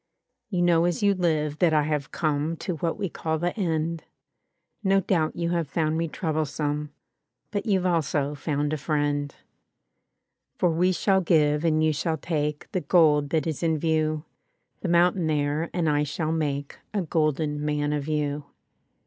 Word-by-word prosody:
"You 180 -4 0
know 170 -1 +4
as 175 +2 -1
you 200 0 +5
live 155 -5 0
that 170 -4 +4
I 150 - +4
have 145 -2 -2
come 155 +1 -1
To 180 -1 -4
what 165 +2 -1
we 205 -2 -1
call 160 -1 -2
the 175 +2 -2
end. 165 -4 -1 0.8
No 195 0 +4
doubt 170 -4 0
you 170 0 -1
have 170 -3 0
found 155 0 0
me 165 +1 0
troublesome. 150 -2 -2 0.6
But 205 +2 -3
you've 190 -3 +2
also 155 -4 +1
found 145 +1 -1
a - - 0
friend; 145 -1 -1 1.2
"For 175 - +2
we 180 +3 +2
shall 190 +1 +2
give 150 -3 +3
and 155 -1 +2
you 155 0 +3
shall 160 +3 -1
take 150 -1 -2
The 185 - -1
gold 150 -2 +4
that 160 0 0
is 160 -4 -3
in 160 -2 +1
view; 155 0 0 0.5
The 185 - -3
mountain 175 0 +3
there 150 +1 0
and 175 -2 0
I 145 -1 +2
shall 155 +2 -2
make 145 -3 -2 0.2
A 200 - +1
golden 155 -2 0
man 150 0 0
of 145 -1 -2
you. 150 -1 -1
155 Hz, 170 wpm, -26 LUFS, 150-170 Hz, 1.2 s, you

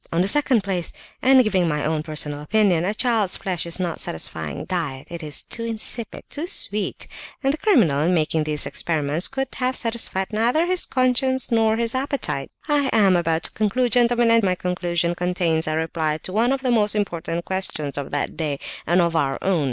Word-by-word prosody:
In 165 - +1
the - - 0
second 255 -2 +3
place, 185 -3 -1 0.3
and 260 0 +6
giving 190 -5 +1
my 150 -2 -1
own 155 0 0
personal 150 -2 -2
opinion, 180 0 +2
a 200 - 0
child's 225 -6 +1
flesh 180 -3 -3
is 170 - -2
not 175 -3 -2
a - - -7
satisfying 80 -1 -3
diet; 150 -8 -4
it 170 0 -6
is 150 -2 -2
too 230 - -5
insipid, 230 0 -2
too 310 +4 -4
sweet; 210 - -1 0.4
and 270 +1 +2
the - - -3
criminal, 215 - +3
in 165 +4 +2
making 160 -2 +1
these 150 -1 +1
experiments, 155 0 -1
could 270 0 -3
have 255 0 0
satisfied 225 -4 -1
neither 240 +10 +2
his 365 0 0
conscience 260 0 +1
nor 225 -1 +3
his 230 0 -1
appetite. 275 +2 -2 0.2
I 290 -3 +2
am 200 -4 +4
about 165 -1 0
to - - -2
conclude, 235 +3 0
gentlemen; 240 -1 +4
and 230 0 +5
my 185 -2 +2
conclusion 175 -1 -1
contains 175 -2 0
a 155 0 0
reply 160 -1 -1
to 185 - -6
one 230 +4 +2
of 275 0 -1
the 255 - +1
most 215 -3 +2
important 170 -4 -2
questions 170 -7 -2
of 140 -1 -4
that 145 - -2
day 150 -4 -2 0.3
and 175 +2 +4
of 170 -1 0
our 135 -4 +1
own! 190 -3 +2
190 Hz, 200 wpm, -22 LUFS, 160-235 Hz, 0.4 s, and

